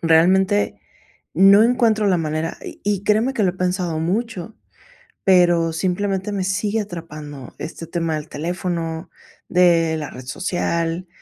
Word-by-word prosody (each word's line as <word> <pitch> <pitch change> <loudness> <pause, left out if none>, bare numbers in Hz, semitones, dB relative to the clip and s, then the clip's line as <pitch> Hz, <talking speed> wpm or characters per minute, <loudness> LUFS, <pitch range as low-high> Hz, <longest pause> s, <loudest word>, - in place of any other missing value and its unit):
realmente, 190 +5 +3 0.6
no 200 +2 +7
encuentro 230 -4 +2
la 185 - +3
manera, 155 +1 -2
y - - -9
y 200 -1 0
créeme 225 +6 +2
que 220 - 0
lo 185 - +3
he - - -12
pensado 180 -3 -1
mucho, 210 +3 -2 0.7
pero, 175 -3 +4
simplemente, 190 +3 -1
me 195 -2 -2
sigue 205 +3 0
atrapando 155 - -8
este 165 +1 -7
tema 165 -2 -2
del 155 0 -6
teléfono, 165 0 -3 0.4
de 170 -3 +4
la 150 -2 -5
red 130 0 -10
social, 170 +3 -2
180 Hz, 140 wpm, -21 LUFS, 165-200 Hz, 0.7 s, no